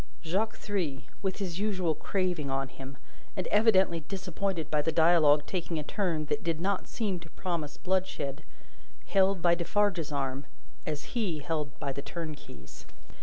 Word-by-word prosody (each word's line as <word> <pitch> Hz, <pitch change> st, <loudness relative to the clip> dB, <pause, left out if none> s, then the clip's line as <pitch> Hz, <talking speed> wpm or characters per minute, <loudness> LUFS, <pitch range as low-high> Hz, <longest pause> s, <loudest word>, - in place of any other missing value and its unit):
Jacques 195 Hz, +7 st, 0 dB
Three, 160 Hz, -10 st, -2 dB, 0.2 s
with 190 Hz, -2 st, -1 dB
his 185 Hz, -3 st, -3 dB
usual 190 Hz, -6 st, +1 dB
craving 180 Hz, -4 st, -1 dB
on 135 Hz, 0 st, -1 dB
him, 135 Hz, 0 st, -9 dB, 0.4 s
and 185 Hz, -, -1 dB
evidently 195 Hz, -5 st, +5 dB
disappointed 180 Hz, -1 st, -3 dB
by 150 Hz, -1 st, +3 dB
the 160 Hz, -, +1 dB
dialogue 160 Hz, -3 st, +5 dB
taking 170 Hz, -2 st, -2 dB
a 150 Hz, -, -1 dB
turn 165 Hz, -3 st, 0 dB
that -, -, -1 dB
did 165 Hz, -2 st, 0 dB
not 195 Hz, +2 st, 0 dB
seem 200 Hz, -6 st, -1 dB
to 170 Hz, -1 st, -12 dB
promise 160 Hz, -4 st, -3 dB
bloodshed, 180 Hz, -6 st, -1 dB, 0.6 s
held 195 Hz, -2 st, +3 dB
by 170 Hz, -1 st, +6 dB
Defarge's 175 Hz, -2 st, +1 dB
arm 135 Hz, -1 st, -2 dB, 0.4 s
as 150 Hz, -1 st, -4 dB
he 210 Hz, -10 st, 0 dB
held 150 Hz, -1 st, -3 dB
by 140 Hz, -, -1 dB
the 140 Hz, -, -4 dB
turnkey's. 150 Hz, -, -8 dB
170 Hz, 155 wpm, -30 LUFS, 150-190 Hz, 0.6 s, by